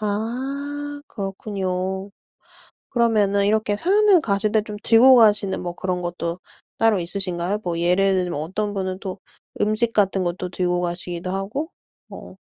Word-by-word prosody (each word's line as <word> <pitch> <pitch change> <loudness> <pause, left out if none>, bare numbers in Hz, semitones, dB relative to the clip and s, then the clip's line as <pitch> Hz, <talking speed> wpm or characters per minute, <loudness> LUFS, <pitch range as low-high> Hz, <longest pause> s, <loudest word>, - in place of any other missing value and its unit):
아 275 +7 -3
그렇군요. 190 -1 -4 0.8
그러면은 210 -4 +2
이렇게 210 0 +1
산을 395 - +4
가실 205 -4 0
때 220 -1 +3
좀 210 -1 -7
들고 250 +3 +7
가시는 205 -5 +3
뭐 175 -1 -4
그런 180 -1 -3
것도 175 0 -3 0.4
따로 225 -3 +3
있으신가요? 180 +1 -1
뭐 170 -2 -2
예를 185 +3 +3
들면 170 -5 -3
어떤 205 +6 -3
분은 185 -1 -3
또 190 0 -6 0.4
음식 215 +2 +1
같은 195 -2 +2
것도 180 +1 -3
들고 180 0 0
가시기도 175 0 -4
하고 210 - -3 0.4
뭐 - - -11
200 Hz, 290 characters per minute, -22 LUFS, 180-220 Hz, 0.8 s, 들고